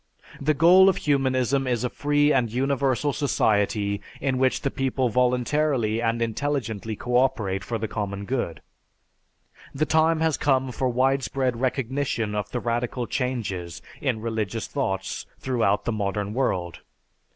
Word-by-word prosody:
"The 150 Hz, +2 st, +2 dB
goal 180 Hz, +5 st, +7 dB
of 190 Hz, -, +1 dB
humanism 135 Hz, -2 st, +1 dB
is 125 Hz, -1 st, 0 dB
a 125 Hz, -, 0 dB
free 145 Hz, 0 st, +2 dB
and 120 Hz, -4 st, +1 dB
universal 135 Hz, +2 st, 0 dB
society 105 Hz, -6 st, +1 dB, 0.2 s
in 130 Hz, -2 st, 0 dB
which 130 Hz, -1 st, +2 dB
the 140 Hz, -, -1 dB
people 130 Hz, -2 st, 0 dB
voluntarily 125 Hz, -1 st, +1 dB
and 115 Hz, 0 st, 0 dB
intelligently 115 Hz, -4 st, -2 dB
cooperate 115 Hz, -6 st, 0 dB
for 115 Hz, +3 st, -3 dB
the 110 Hz, 0 st, -3 dB
common 100 Hz, -2 st, -4 dB
good. 120 Hz, -9 st, -3 dB, 1.1 s
"The 155 Hz, +3 st, +1 dB
time 160 Hz, +1 st, +3 dB
has 160 Hz, -2 st, +2 dB
come 130 Hz, -2 st, +1 dB
for 130 Hz, +1 st, -1 dB
widespread 130 Hz, -1 st, 0 dB
recognition 130 Hz, -4 st, -1 dB
of 105 Hz, -1 st, -2 dB
the 125 Hz, -, -2 dB
radical 120 Hz, +1 st, -2 dB
changes 110 Hz, -, -3 dB, 0.2 s
in 110 Hz, -, -1 dB
religious 110 Hz, -1 st, -2 dB
thoughts 95 Hz, -9 st, -3 dB
throughout 115 Hz, -6 st, 0 dB
the -, -, 0 dB
modern 105 Hz, -1 st, -2 dB
world. 90 Hz, -, -1 dB
125 Hz, 140 wpm, -25 LUFS, 110-135 Hz, 1.1 s, goal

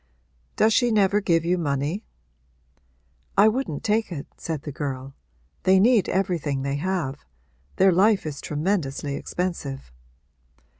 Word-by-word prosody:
'Does 220 Hz, +1 st, +4 dB
she 245 Hz, +1 st, +3 dB
never 205 Hz, -2 st, +3 dB
give 165 Hz, -3 st, +2 dB
you 180 Hz, +1 st, +1 dB
money?' 145 Hz, +5 st, -1 dB, 1.3 s
'I 205 Hz, +2 st, +7 dB
wouldn't 220 Hz, -, -3 dB
take 220 Hz, -1 st, +1 dB
it,' 145 Hz, -5 st, -5 dB
said 155 Hz, -3 st, -5 dB
the 150 Hz, -, -5 dB
girl. 135 Hz, -2 st, -5 dB, 0.5 s
'They 190 Hz, 0 st, +4 dB
need 225 Hz, 0 st, +4 dB
everything 165 Hz, -8 st, -1 dB
they 140 Hz, 0 st, -1 dB
have 155 Hz, -5 st, -2 dB, 0.5 s
their 190 Hz, 0 st, +5 dB
life 195 Hz, +3 st, +3 dB
is 145 Hz, -3 st, -5 dB
tremendously 150 Hz, -3 st, -2 dB
expensive.' 140 Hz, -, -4 dB
175 Hz, 130 wpm, -24 LUFS, 140-200 Hz, 1.3 s, I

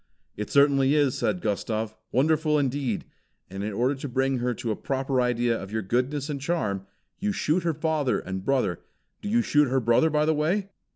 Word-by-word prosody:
"It 105 Hz, 0 st, -5 dB
certainly 140 Hz, 0 st, +4 dB
is," 145 Hz, -4 st, +3 dB
said 180 Hz, -, -1 dB
Gustav. 110 Hz, +1 st, -2 dB, 0.2 s
"Wonderful 155 Hz, +3 st, +2 dB
indeed! 135 Hz, -5 st, -1 dB, 0.5 s
And 95 Hz, +1 st, -5 dB
in 105 Hz, -, -2 dB
order 125 Hz, +7 st, +1 dB
to 140 Hz, 0 st, -6 dB
bring 130 Hz, +1 st, 0 dB
her 125 Hz, 0 st, -1 dB
to 115 Hz, +1 st, -3 dB
a -, -, -1 dB
proper 135 Hz, +1 st, -1 dB
idea 120 Hz, -1 st, +1 dB
of 95 Hz, -2 st, -7 dB
your 110 Hz, 0 st, -2 dB
goodness 130 Hz, +7 st, -1 dB
and 145 Hz, -3 st, -4 dB
charm, 105 Hz, -, -2 dB, 0.3 s
you 205 Hz, +2 st, 0 dB
shoot 180 Hz, -2 st, 0 dB
her 165 Hz, -2 st, -1 dB
father 155 Hz, -4 st, 0 dB
and 95 Hz, 0 st, -5 dB
brother 125 Hz, -10 st, 0 dB, 0.4 s
do 205 Hz, -, -4 dB
you 235 Hz, +2 st, +3 dB
shoot 150 Hz, -6 st, +3 dB
her 130 Hz, +1 st, +1 dB
brother, 120 Hz, +7 st, +3 dB
by 150 Hz, 0 st, +2 dB
the 160 Hz, -, +3 dB
way?" 185 Hz, +7 st, 0 dB
135 Hz, 195 wpm, -26 LUFS, 115-150 Hz, 0.5 s, certainly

